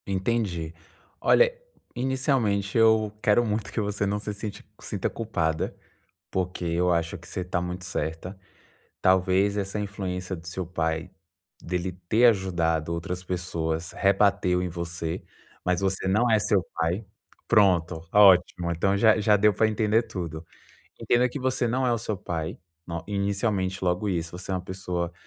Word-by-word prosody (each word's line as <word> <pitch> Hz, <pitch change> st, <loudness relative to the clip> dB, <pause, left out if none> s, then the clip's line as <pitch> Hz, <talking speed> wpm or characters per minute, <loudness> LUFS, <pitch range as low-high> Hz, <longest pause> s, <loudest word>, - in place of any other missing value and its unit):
Entendi. 95 Hz, -4 st, -1 dB, 0.5 s
Olha, 485 Hz, 0 st, +4 dB, 0.4 s
inicialmente 125 Hz, -6 st, 0 dB
eu 110 Hz, -2 st, +4 dB
quero 120 Hz, +1 st, +4 dB
muito 105 Hz, -2 st, -2 dB
que -, -, -2 dB
você 100 Hz, -1 st, -1 dB
não 100 Hz, +1 st, 0 dB
se 105 Hz, 0 st, -4 dB
sinte 105 Hz, 0 st, -7 dB, 0.2 s
sinta -, -, -2 dB
culpada, 85 Hz, -8 st, -2 dB, 0.5 s
porque 90 Hz, -1 st, -2 dB
eu 85 Hz, +1 st, +1 dB
acho 85 Hz, +2 st, -1 dB
que 85 Hz, 0 st, -15 dB
você 95 Hz, -, -4 dB
está 90 Hz, 0 st, -2 dB
muito 90 Hz, +1 st, -5 dB
certa. 90 Hz, +2 st, -4 dB, 0.6 s
Talvez 95 Hz, +2 st, +3 dB
essa 100 Hz, +1 st, -2 dB
influência 95 Hz, -2 st, -4 dB
do 80 Hz, 0 st, -13 dB
seu 90 Hz, +1 st, -4 dB
pai, 80 Hz, -2 st, -2 dB, 0.5 s
dele 90 Hz, +1 st, -2 dB, 0.2 s
ter 115 Hz, +5 st, +5 dB
ajudado 85 Hz, -7 st, +1 dB
outras 90 Hz, +2 st, -4 dB
pessoas, 85 Hz, -3 st, -3 dB
rebateu 100 Hz, -2 st, +2 dB
em 90 Hz, -, -1 dB
você, 85 Hz, -1 st, -4 dB, 0.4 s
mas 90 Hz, 0 st, +1 dB
você 95 Hz, -1 st, -1 dB
não 110 Hz, +6 st, +3 dB
é 110 Hz, -, +5 dB
seu 100 Hz, -2 st, +2 dB
pai. 85 Hz, +6 st, -1 dB, 0.4 s
Pronto, 90 Hz, -6 st, +3 dB
ótimo, 90 Hz, -3 st, +5 dB
então 95 Hz, +4 st, +1 dB
já 110 Hz, +1 st, +5 dB
já 105 Hz, 0 st, +4 dB
deu 105 Hz, +1 st, +4 dB
para 110 Hz, +3 st, +3 dB
entender 110 Hz, +1 st, +2 dB
tudo. 85 Hz, -7 st, -6 dB, 0.5 s
Entenda 125 Hz, +1 st, +2 dB
que 135 Hz, -, -6 dB
você 130 Hz, -1 st, 0 dB
não 130 Hz, +2 st, +1 dB
é 120 Hz, -, +3 dB
o 115 Hz, -, 0 dB
seu 110 Hz, -1 st, -3 dB
pai 85 Hz, -2 st, -4 dB, 0.3 s
no 85 Hz, -1 st, -4 dB
inicialmente, 100 Hz, -1 st, -1 dB
logo 90 Hz, +3 st, 0 dB
isso, 85 Hz, -1 st, -3 dB
você 95 Hz, -, -7 dB
é -, -, 0 dB
uma 90 Hz, -, -1 dB
pessoa 90 Hz, -2 st, -4 dB
95 Hz, 155 wpm, -26 LUFS, 85-105 Hz, 0.6 s, ter